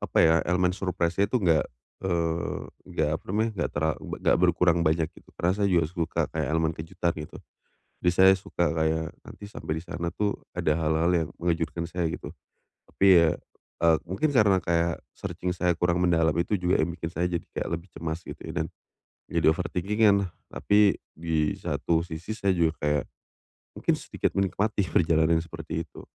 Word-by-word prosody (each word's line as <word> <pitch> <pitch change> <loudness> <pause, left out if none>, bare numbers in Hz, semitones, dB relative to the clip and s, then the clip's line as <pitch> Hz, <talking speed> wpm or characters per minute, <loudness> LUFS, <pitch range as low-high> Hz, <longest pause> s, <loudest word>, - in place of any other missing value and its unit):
apa - - -1
ya, 80 - +5
elemen 90 0 +2
surprise-nya 90 0 0
itu 125 - +1
enggak, 85 -7 +3 0.4
eee, 85 -3 -1 0.3
enggak, - - 0
apa - - -35
namanya, 110 +4 +1
enggak - - 0
terla 80 +1 +2
be - - -6
nggak - - +5
berkurang 90 -1 +3
banyak 80 0 +2
gitu. - - -19
Karena 90 +2 +1
saya 100 -1 +1
juga 85 -3 +3
suka 85 0 -2
kayak - - -1
elemen 80 0 +1
kejutan 85 +2 -2
gitu. 75 - -8 0.7
Jadi 90 - +3
saya 95 0 +8
suka 90 -2 -2
kayak, 80 0 0
nanti 105 - -11
sampai 100 -6 -5
di 80 - -6
sana 85 -1 -4
itu, 100 +3 -1 0.2
ada 80 - +1
hal-hal 80 +2 +1
yang 80 -2 +1
mengejutkan 85 -1 -1
saya 85 0 -2
gitu. 75 -2 -6 0.5
Tapi 100 - -1
ya, 85 -1 +5 0.5
eee, 85 -1 +5
mungkin 95 - 0
karena 105 -8 +4
kayak, 85 0 0 0.2
searching 90 0 -3
saya 90 0 +2
kurang 90 +1 +1
mendalam 80 -3 +2
itu 85 +5 0
juga, 90 0 +2
yang 85 +2 0
bikin 80 -1 -5
saya 85 +1 -1
jadi 85 -1 -2
kayak - - -4
lebih 95 - -21
cemas 80 0 -4
gitu, - - -9
dan - - -2 0.6
jadi - - +1
overthinking-an. 100 +3 +2 0.2
Tapi, 105 -1 +3 0.2
di 80 -2 0
satu 85 -1 0
sisi 85 +4 -6
saya 100 -3 +1
juga 80 -1 +2
kayak, 75 0 +1 0.7
mungkin - - +2
sedikit - - -3
menikmati 100 +2 +1
perjalanan 80 0 +3
yang 80 - -2
seperti 80 0 -5
itu. 75 - -13
85 Hz, 175 wpm, -27 LUFS, 80-90 Hz, 0.7 s, saya